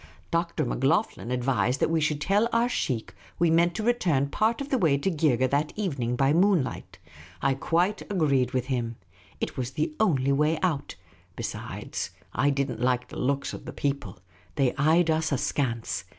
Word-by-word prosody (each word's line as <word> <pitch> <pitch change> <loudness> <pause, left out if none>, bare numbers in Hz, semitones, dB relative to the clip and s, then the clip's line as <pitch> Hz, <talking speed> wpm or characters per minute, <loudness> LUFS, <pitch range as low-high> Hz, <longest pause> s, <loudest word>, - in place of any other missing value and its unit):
Dr. 170 -2 0
Macloghlen 135 - 0
advised 125 +1 +1
that - - +1
we 165 -1 +2
should 150 -1 0
tell 205 +7 +2
our 230 +1 +3
sheikh 125 - -2 0.2
we 170 -1 +3
meant 170 +1 +3
to 220 - -2
return 170 - +1
part 220 +8 +1
of 280 0 -5
the 265 - +1
way 155 -7 +3
to 190 +7 0
Geergeh 145 -6 +2
that 145 +2 0
evening 135 - -1
by 135 +3 +3
moonlight. 175 -5 +1 0.4
I 135 - +2
quite 175 +9 0
agreed 140 - +2
with 130 -1 -1
him. 120 -3 -2 0.4
It - - -4
was 125 -2 -2
the 320 - -1
only 140 -11 +2
way 150 +3 +2
out. 155 -6 -1 0.4
Besides, - - -5 0.2
I 145 - +2
did 140 -1 0
n't 115 -1 -7
like 125 0 +1
the - - -7
looks 140 +2 -1
of - - -8
the - - -7
people. 140 -9 -3 0.4
They 135 -3 +2
eyed 160 +3 +3
us 160 0 0
askance. 115 -7 -1
145 Hz, 180 wpm, -27 LUFS, 130-170 Hz, 0.4 s, our